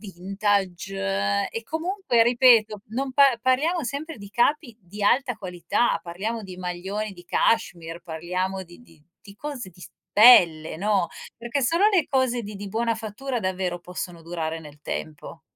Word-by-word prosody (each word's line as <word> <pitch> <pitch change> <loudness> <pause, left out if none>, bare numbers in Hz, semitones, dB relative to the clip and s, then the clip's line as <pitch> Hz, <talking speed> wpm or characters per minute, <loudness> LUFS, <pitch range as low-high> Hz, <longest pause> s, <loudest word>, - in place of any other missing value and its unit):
vintage. 175 - -1
E, 230 - -5
comunque, 320 - 0
ripeto, 230 -3 +4
non 260 +4 -3
par 270 -3 +5
parliamo 290 +6 +1
sempre 285 +5 -5
di 200 -1 -11
capi 240 +2 +1
di 200 +3 -9
alta 245 +2 +2
qualità: 185 +5 -1
parliamo 210 +7 -4
di 185 -3 -9
maglioni 190 +4 -4
di 175 -2 -14
cachemire, 170 -8 0
parliamo 180 +3 -3
di 175 -1 -15
di 240 -9 -19
di 150 - -27 0.2
di 200 -1 -14
cose 265 -4 -6
di 180 0 -18
s - - -11 0.2
pelle, 170 -9 +6
no, 200 -2 +1 0.3
perché 235 +4 -3
solo 335 +10 +3
le 350 -7 +3
cose 260 -3 +1
di 210 0 -8
di 200 0 -7
buona 230 +2 0
fattura, 230 +4 -4
davvero, 185 -2 -2
possono 175 -1 -7
durare 165 -1 -4
nel 150 -2 -13
tempo. 150 0 -6
205 Hz, 160 wpm, -24 LUFS, 175-245 Hz, 0.3 s, pelle